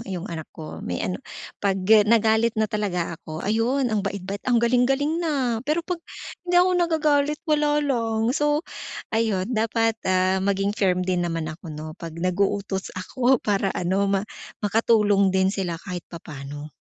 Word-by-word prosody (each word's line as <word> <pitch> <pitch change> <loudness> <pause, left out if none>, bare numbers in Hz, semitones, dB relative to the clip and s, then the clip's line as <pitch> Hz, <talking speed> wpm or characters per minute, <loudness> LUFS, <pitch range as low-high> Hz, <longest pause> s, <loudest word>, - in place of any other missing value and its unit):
yung 180 -1 -4
anak 160 -2 -6
ko 155 -2 -8
may 90 - -2
ano, 90 0 -2 0.4
pag 195 -1 +1 0.3
nagalit 225 +1 +3
na 220 - +3
talaga 185 -5 -1
ako 160 -1 -8
ayun 230 +6 +1
ang 215 -2 0
bait-bait, 200 0 -4
ang 245 - +4
galing-galing 270 +7 +2
na. 265 -8 0
Pero 305 +4 +1
kapag 360 -2 -3 0.4
hindi 355 0 +1
ako 365 +1 +6
nagagalit 300 -4 +2
wala 295 -1 +3
lang, 230 -3 0
so 295 0 +2 0.5
ayun 220 -4 +1
dapat 225 0 +1 0.2
ah, 185 0 +2
maging 195 +1 +1
firm 185 -4 +2
din 180 -1 0
naman 165 -2 -2
ako 165 +1 -11
no, 155 +1 -7
pag 165 -1 -6
nag-uutos 190 +2 -1
ako 250 +7 +2
para 200 -1 +1
ano, 190 +3 +1
ma 195 -1 +2 0.4
makatulong 210 -2 +3
din 190 0 +3
sila 180 -5 -2
kahit 180 -3 -5
papaano. 145 -2 -8
205 Hz, 155 wpm, -24 LUFS, 185-245 Hz, 0.5 s, ako